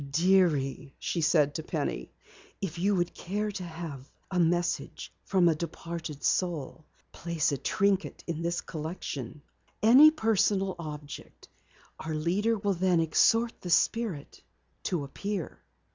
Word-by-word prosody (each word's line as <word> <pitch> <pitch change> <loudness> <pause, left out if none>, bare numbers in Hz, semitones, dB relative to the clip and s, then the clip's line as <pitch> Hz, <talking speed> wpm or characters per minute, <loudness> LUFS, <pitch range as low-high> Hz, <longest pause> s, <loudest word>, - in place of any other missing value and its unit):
"Dearie," 150 -4 +2
she 170 - -2
said 150 -2 +3
to 160 - -3
Penny, - - -3 0.5
"if 175 -4 -4
you 200 +3 +2
would 175 -1 0
care 210 +3 -3
to 195 -2 -6
have 160 -5 -7 0.2
a 180 - 0
message 175 +1 0
from 185 -3 +3
a 165 - +5
departed 165 -2 -6
soul, 160 -4 -1 0.3
place 170 -4 -1
a 140 - -1
trinket 200 +5 0
in 165 -1 -3
this 170 +1 -1
collection. 150 -4 -6 0.4
Any 260 +8 +9
personal 205 - +1
object. 150 -3 -9 0.5
Our 160 -1 -4
leader 195 +9 +1
will 200 -1 0
then 180 -1 +2
exhort 225 +8 +3
the 180 - -6
spirit 175 -1 0 0.4
to 170 -5 -1
appear." 195 +6 -5
170 Hz, 130 wpm, -29 LUFS, 155-195 Hz, 0.5 s, Any